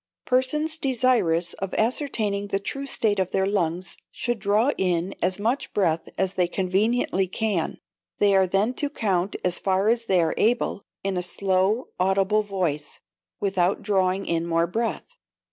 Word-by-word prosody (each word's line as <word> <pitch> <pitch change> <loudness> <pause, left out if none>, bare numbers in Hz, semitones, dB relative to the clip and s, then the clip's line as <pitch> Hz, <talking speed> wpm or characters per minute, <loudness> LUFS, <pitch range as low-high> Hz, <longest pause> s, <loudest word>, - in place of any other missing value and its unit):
Persons 300 +5 +1
desirous 235 - +1
of 195 -1 -4
ascertaining 220 -5 0
the 195 - 0
true 275 +7 -4
state 210 -6 +2
of 185 -1 0
their 190 0 +1
lungs 180 -2 -1
should 240 -2 -3
draw 215 +6 +2
in 180 -1 0
as 185 +2 0
much 235 +7 -1
breath 170 -5 +1
as 190 0 0
they 180 -2 +1
conveniently 195 +2 0
can, 200 -3 -1 0.4
they 200 -1 +4
are 190 -1 +4
then 195 +6 +1
to 290 +3 -2
count 195 - -1
as 180 -1 +2
far 195 +2 +1
as 230 0 +1
they 190 -4 +3
are 165 -1 +1
able, 235 -3 +1 0.2
in 195 -1 -1
a - - 0
slow 190 +2 +1
and 250 - -8 0.2
audible 195 +2 +2
voice, 180 -8 -3 0.4
without 190 -2 0
drawing 190 -1 +1
in 170 0 -1
more 165 0 +2
breath. 225 +6 -2
195 Hz, 160 wpm, -24 LUFS, 185-225 Hz, 0.4 s, they